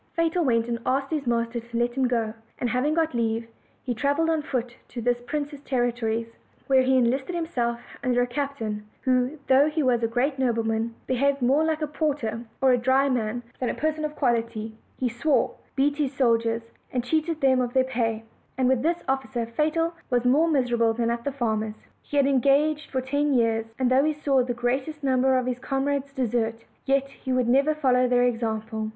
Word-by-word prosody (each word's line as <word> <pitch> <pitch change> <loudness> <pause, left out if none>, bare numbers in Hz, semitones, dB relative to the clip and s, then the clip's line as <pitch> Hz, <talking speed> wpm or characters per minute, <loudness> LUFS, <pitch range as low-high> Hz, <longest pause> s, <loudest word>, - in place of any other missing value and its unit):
Fatal 335 +1 +1
went 230 -4 +2
and 235 -1 -2
asked 270 +3 0
his 295 -5 -2
master 235 0 0
to 235 0 -7
let 240 0 +1
him 260 0 +1
go; 230 -3 -1 0.2
and 245 -2 -1
having 280 +6 +1
got 325 -3 +1
leave, 230 -1 -1 0.4
he 250 - -2
traveled 285 +7 +1
on 320 -1 +1
foot 250 -5 -3
to 240 - -7
this 240 +1 0
prince's 290 +2 -4
territories, 235 -3 -1 0.3
where 265 -1 +4
he 260 0 +3
en 240 -2 +4
listed 270 +7 -3
himself 245 -9 -1 0.2
under 245 -1 +2
a - - +1
captain 245 -5 -3 0.2
who, 255 +2 +1
though 275 +3 +5
he 310 0 -1
was 245 -3 +2
a 230 - +2
great 260 +4 0
nobleman, 230 -2 0
behaved 275 +2 +1
more 270 +5 +3
like 315 -1 0
a - - 0
porter 285 -7 -2 0.2
or 265 - +6
a 245 - +3
drayman 245 -3 +1 0.2
than 250 - -1
a - - -2
person 310 0 -1
of 300 0 -3
quality; 230 -4 -1 0.2
he 255 - 0
swore, 245 +5 +1 0.2
beat 285 +1 +2
his 290 -4 0
soldiers, 230 -3 +1 0.2
and 250 -1 -1
cheated 315 +4 0
them 260 -2 +3
of 245 -1 -2
their 260 - +4
pay 230 -4 -1 0.3
and 260 -1 +2
with 260 -2 +2
this 335 +4 0
officer 265 -3 -1
Fatal 315 +7 0 0.2
was 245 -1 +1
more 290 +7 +4
miserable 240 -6 +2
than 235 0 0
at 235 0 -3
the 280 - -1
farmer's. 220 -4 -2 0.2
He 290 - -4
had 280 - +5
en 275 -1 +3
gaged 290 +2 +2
for 260 - -1
ten 285 +2 0
years; 225 -2 +1
and 255 -1 +1
though 265 +2 +5
he 310 +1 +2
saw 280 -3 +2
the 245 -1 -3
greatest 265 +5 -2
number 260 -1 +3
of 255 - 0
his 250 -1 -2
comrades 275 +1 -1
desert, 230 -3 -1 0.2
yet 275 0 +2
he 265 -1 -7
would 255 -2 +2
never 275 +5 +3
follow 255 -4 +3
their 245 0 +3
example. 220 -2 -1
255 Hz, 205 wpm, -25 LUFS, 235-280 Hz, 0.4 s, or